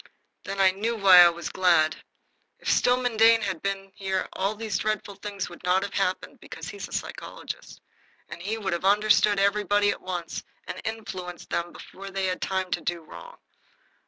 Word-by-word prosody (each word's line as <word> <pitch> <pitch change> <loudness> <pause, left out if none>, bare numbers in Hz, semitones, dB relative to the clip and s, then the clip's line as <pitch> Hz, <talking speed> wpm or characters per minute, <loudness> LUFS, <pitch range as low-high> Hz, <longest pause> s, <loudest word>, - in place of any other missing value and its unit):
Then 195 0 -5
I 190 -1 +6
knew 220 +5 -2
why 195 -4 +8
I 175 -1 +10
was 170 0 -5
glad. 170 -4 +3 0.6
If - - -1
Stillman 245 -2 +2
Dane 225 +1 +6
had 190 -5 -3
been 195 0 -3
here 190 -1 -2
all 195 +3 -1
these 215 -2 -2
dreadful 215 -1 -2
things 200 -1 -5
would 175 - -13
not 185 +2 +2
have 200 - -5
happened, 185 -2 -2
because - - -9
he - - -8
is - - -6
a - - -19
psychologist, - - -6 0.5
and - - -9
he 210 +5 -2
would 195 -4 -2
have 170 - -3
understood 210 +1 +4
everybody 205 +1 +2
at - - -6
once 175 -3 -5 0.2
and - - -6
influenced 185 -5 -6
them 170 0 -1
before 195 +1 -10
they 195 0 -2
had 185 -1 -2
time 190 -1 -2
to - - 0
do 175 -1 -2
wrong. - - -12
195 Hz, 190 wpm, -26 LUFS, 185-210 Hz, 0.6 s, I